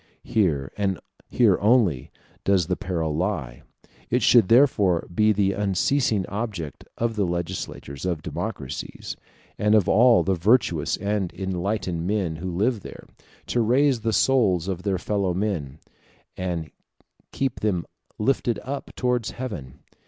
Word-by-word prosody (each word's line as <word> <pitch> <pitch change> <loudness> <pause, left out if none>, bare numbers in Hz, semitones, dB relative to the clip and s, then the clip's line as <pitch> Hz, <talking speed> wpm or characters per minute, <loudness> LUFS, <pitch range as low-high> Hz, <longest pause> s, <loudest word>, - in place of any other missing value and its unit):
Here, 80 -11 0
and 100 -3 0 0.3
here 110 -7 +3
only, 105 - +3 0.3
does 95 -3 +3
the 90 +2 -1
peril 80 -5 -2
lie. 80 -9 -2 0.5
It 125 +2 +1
should 115 -6 +6
therefore 105 -8 +4
be 110 +4 +4
the 100 -1 +2
unceasing 105 +2 +1
object 100 -8 -5
of 115 -1 -1
the 105 - +1
legislators 85 -5 -5
of 85 -4 -2
democracies, - - -5 0.4
and 105 +1 +3
of 105 -4 +3
all 120 +3 +5
the 95 - +1
virtuous 90 - +2
and 100 -3 -1
enlightened 95 -2 -2
men 95 -6 -1
who 90 +3 -4
live 105 +7 0
there, - - -11 0.4
to 120 - 0
raise 130 +3 +3
the 115 0 0
souls 95 -6 +2
of 95 -2 -3
their 95 -1 0
fellow 95 -1 -1
citizens, 85 -9 -2 0.6
and 85 -5 -3 0.6
keep 135 -3 -2
them 95 -5 0 0.3
lifted 120 +1 +1
up 140 +1 -5
towards 125 -3 0
heaven. 80 - -7
100 Hz, 135 wpm, -24 LUFS, 85-115 Hz, 0.6 s, should